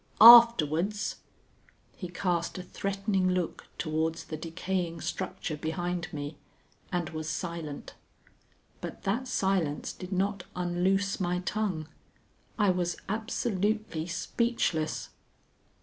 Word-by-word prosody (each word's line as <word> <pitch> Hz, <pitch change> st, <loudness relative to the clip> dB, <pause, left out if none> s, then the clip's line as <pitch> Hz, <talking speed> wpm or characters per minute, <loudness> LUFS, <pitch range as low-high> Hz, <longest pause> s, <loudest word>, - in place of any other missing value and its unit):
Afterwards 210 Hz, -5 st, +8 dB, 0.4 s
" -, -, -36 dB, 0.3 s
He 180 Hz, -, -6 dB
cast 175 Hz, -1 st, -1 dB
a 185 Hz, -, -5 dB
threatening 195 Hz, 0 st, -1 dB
look 180 Hz, -2 st, -2 dB
towards 160 Hz, 0 st, -1 dB
the 155 Hz, -, -6 dB
decaying 170 Hz, +1 st, -3 dB
structure 185 Hz, -4 st, -3 dB
behind 175 Hz, +2 st, -3 dB
me, 145 Hz, 0 st, -5 dB, 0.5 s
and 175 Hz, -3 st, -1 dB
was 155 Hz, -1 st, -4 dB
silent. 160 Hz, -2 st, -5 dB, 0.9 s
But -, -, -7 dB
that 235 Hz, +7 st, 0 dB
silence 190 Hz, -10 st, 0 dB
did 185 Hz, 0 st, -9 dB
not 195 Hz, 0 st, 0 dB
unloose 180 Hz, +2 st, +1 dB
my 180 Hz, -1 st, 0 dB
tongue. 185 Hz, -6 st, -2 dB, 0.7 s
I 205 Hz, -3 st, +4 dB
was 175 Hz, -1 st, -1 dB
absolutely 215 Hz, -5 st, -1 dB
speechless. 175 Hz, -3 st, -1 dB
180 Hz, 105 wpm, -29 LUFS, 165-195 Hz, 0.9 s, Afterwards